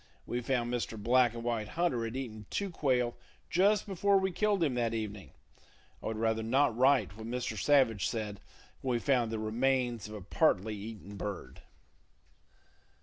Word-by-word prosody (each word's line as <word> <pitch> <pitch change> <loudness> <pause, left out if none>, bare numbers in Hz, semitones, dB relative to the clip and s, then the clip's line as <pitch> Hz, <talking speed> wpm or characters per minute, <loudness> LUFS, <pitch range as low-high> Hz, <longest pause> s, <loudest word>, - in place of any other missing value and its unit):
We 120 - -2
found 120 -1 -1
Mr. 115 -2 -2
Black 120 +2 +3
and 115 - -5
White 115 -3 -1
Hunter 165 -10 +1
had 115 +2 -5
eaten 110 -6 -6
two 200 -2 -2
quail 125 -7 +1 0.4
just 200 +3 +3
before 200 0 +2
we 190 0 +1
killed 205 0 +1
him 145 -5 +1
that 115 -2 0
evening. 105 -3 -5 0.7
I - - -5
would 110 - -2
rather 110 0 +1
not 125 +2 +2
write 130 -5 +3
what 110 +1 -8
Mr. 120 -2 -3
Savage 115 -5 +3
said 105 -3 -4 0.4
when 130 -2 0
we - - +1
found 120 -4 +1
the 110 - -2
remains 120 +1 0
of 105 - -8
a 105 - -7
partly 105 - +1
eaten 105 -1 -8
bird. 100 -1 -6
120 Hz, 170 wpm, -31 LUFS, 110-135 Hz, 0.7 s, Black